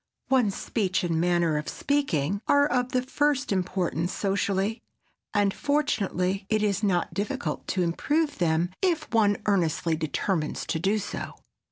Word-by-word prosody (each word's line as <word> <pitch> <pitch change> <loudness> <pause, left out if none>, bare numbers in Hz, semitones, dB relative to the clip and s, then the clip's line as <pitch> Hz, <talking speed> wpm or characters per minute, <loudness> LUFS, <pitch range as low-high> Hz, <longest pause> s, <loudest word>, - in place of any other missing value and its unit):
One's 245 -7 +3
speech 190 -6 -1
and 165 -2 0
manner 170 -3 +2
of 150 - -5
speaking 200 - 0
are 285 0 +5
of 250 -3 0
the 255 -1 +1
first 285 0 0
importance 180 -2 -1
socially, 200 +2 -1 0.5
and 205 -2 +2
fortunately 195 -10 0
it 215 -1 +2
is 200 -1 +1
not 180 -5 +1
difficult 180 -5 -3
to 185 - 0
improve 290 - 0
them 170 +1 +1
if 355 -4 +1
one 205 -3 +4
earnestly 170 -4 +1
determines 160 +1 -2
to 160 - -2
do 195 +6 +1
so. 205 - -5
195 Hz, 145 wpm, -26 LUFS, 175-235 Hz, 0.5 s, are